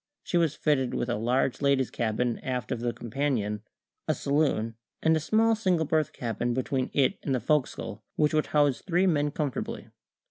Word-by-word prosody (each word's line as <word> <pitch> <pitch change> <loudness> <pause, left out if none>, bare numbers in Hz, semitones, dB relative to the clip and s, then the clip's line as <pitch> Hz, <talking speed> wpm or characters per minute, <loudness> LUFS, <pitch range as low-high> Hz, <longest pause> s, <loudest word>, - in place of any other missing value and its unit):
She - - -4
was 165 -3 +2
fitted 135 -5 +1
with 120 - -1
a 120 - +1
large 125 +5 0
ladies' 140 -2 +2
cabin 115 +1 -1
aft 125 -3 -3
of - - -1
the 120 0 -1
companion, 120 -4 -2 0.5
a - - +2
saloon, 140 -6 +1 0.3
and 160 0 +4
a - - +2
small 220 +8 +3
single 185 -7 +1
berth 155 -1 +1
cabin 120 0 -2
between 130 0 -1
it 135 -3 +2
and 135 - 0
the - - 0
fo'c's'le, 115 -4 -1
which 150 0 +2
would 155 0 +2
house 145 -3 +2
three 180 0 +1
men 150 -5 +2
comfortably. 145 -2 -4
140 Hz, 180 wpm, -28 LUFS, 120-155 Hz, 0.5 s, and